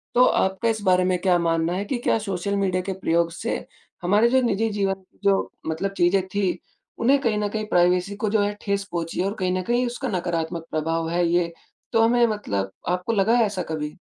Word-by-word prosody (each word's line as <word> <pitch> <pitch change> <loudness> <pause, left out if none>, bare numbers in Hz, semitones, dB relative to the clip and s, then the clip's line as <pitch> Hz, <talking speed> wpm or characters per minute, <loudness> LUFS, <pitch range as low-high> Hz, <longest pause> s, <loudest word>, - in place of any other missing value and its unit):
तो 250 +1 +7
आपका 190 +2 +1
इस 220 -1 -1
बारे 185 -1 +4
में 185 0 +2
क्या 185 -2 +3
मानना 165 0 +1
है, 195 +3 -2
कि 255 +4 -2
क्या 240 - +2
सोशल 200 -1 -2
मीडिया 185 -2 +1
के 195 - -3
प्रयोग 170 -1 +1
से 165 - -4 0.4
हमारे 205 +6 +4
जो 260 +1 +4
निजी 225 -2 +1
जीवन, 195 -2 -1 0.2
जो, 200 -1 +2 0.2
मतलब 165 +5 -2
चीज़ें 180 +2 +3
थी 190 -1 -1 0.4
उन्हें 270 +4 +4
कहीं 230 -5 +1
न 210 - 0
कहीं 215 +1 -3
प्राइवेसी 180 +1 +2
को 215 0 -1
जो 215 0 +2
है, 205 0 0
ठेस 200 -1 -1
पहुँची 170 -1 -3
है - - 0
और 200 - -2
कहीं 185 -1 0
न - - -1
कहीं 240 +5 +1
उसका 245 +3 -4
नकारात्मक 170 -3 -2
प्रभाव 165 +1 -1
है 175 +1 +1
ये, 170 -1 +1 0.4
तो 225 - +4
हमें 240 +1 +4
मतलब 100 - -2 0.2
आपको 180 +5 -1
लगा 215 +2 +3
है 235 - +4
ऐसा 200 -3 -3
कभी? 150 -1 -4
190 Hz, 215 wpm, -24 LUFS, 175-215 Hz, 0.4 s, तो